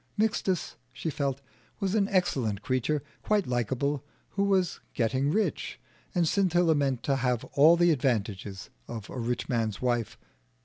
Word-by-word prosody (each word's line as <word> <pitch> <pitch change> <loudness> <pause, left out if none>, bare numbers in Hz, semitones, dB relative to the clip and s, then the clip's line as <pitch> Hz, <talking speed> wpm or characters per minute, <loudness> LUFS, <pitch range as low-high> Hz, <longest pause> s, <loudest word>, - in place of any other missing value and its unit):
Mixtus, 205 -4 0
she 130 +6 -4
felt, 140 -1 -2 0.4
was 195 -2 0
an 205 -2 +2
excellent 125 - 0
creature, 130 +3 0 0.2
quite 210 -3 +1
likable, 130 +4 -1 0.3
who 200 0 0
was 190 -3 +1 0.2
getting 130 +4 +1
rich; 215 +7 -1 0.4
and 175 -2 +3
Scintilla 175 -3 +3
meant 135 -5 0
to 135 -1 +1
have 125 -2 0
all 155 +4 +7
the 175 0 +5
advantages 105 -8 -1 0.2
of 110 -3 -7
a 130 - -5
rich 120 +1 -2
man's 110 -4 -1
wife. 120 -3 -1
140 Hz, 145 wpm, -28 LUFS, 120-175 Hz, 0.4 s, all